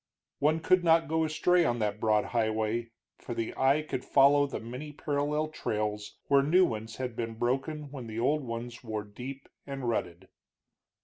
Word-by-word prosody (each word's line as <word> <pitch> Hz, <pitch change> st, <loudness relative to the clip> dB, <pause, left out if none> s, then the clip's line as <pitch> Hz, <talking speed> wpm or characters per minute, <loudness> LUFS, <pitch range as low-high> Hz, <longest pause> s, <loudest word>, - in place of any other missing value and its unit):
One 155 Hz, +3 st, +2 dB
could 185 Hz, +2 st, +3 dB
not 165 Hz, -1 st, +4 dB
go 160 Hz, +1 st, +1 dB
astray 175 Hz, +3 st, +3 dB
on 120 Hz, -7 st, +1 dB
that 105 Hz, -2 st, -1 dB
broad 110 Hz, -1 st, +2 dB
highway, 110 Hz, 0 st, 0 dB, 0.3 s
for 120 Hz, -, -6 dB
the 115 Hz, -1 st, -3 dB
eye 135 Hz, +3 st, +3 dB
could 130 Hz, -4 st, -4 dB
follow 145 Hz, +1 st, +5 dB
the -, -, -5 dB
many 125 Hz, +6 st, -7 dB
parallel 145 Hz, +1 st, -1 dB
trails, 105 Hz, -7 st, -3 dB
where 140 Hz, -1 st, +5 dB
new 175 Hz, +7 st, +5 dB
ones 110 Hz, -2 st, -4 dB
had 125 Hz, -2 st, -4 dB
been 115 Hz, -1 st, -4 dB
broken 135 Hz, +5 st, -2 dB
when 130 Hz, -5 st, -7 dB
the 110 Hz, 0 st, -5 dB
old 145 Hz, +6 st, +2 dB
ones 120 Hz, 0 st, -6 dB
wore 110 Hz, -2 st, -3 dB
deep 125 Hz, +7 st, -8 dB, 0.2 s
and 135 Hz, -3 st, -4 dB
rutted. 95 Hz, -5 st, -2 dB
125 Hz, 175 wpm, -29 LUFS, 110-150 Hz, 0.3 s, follow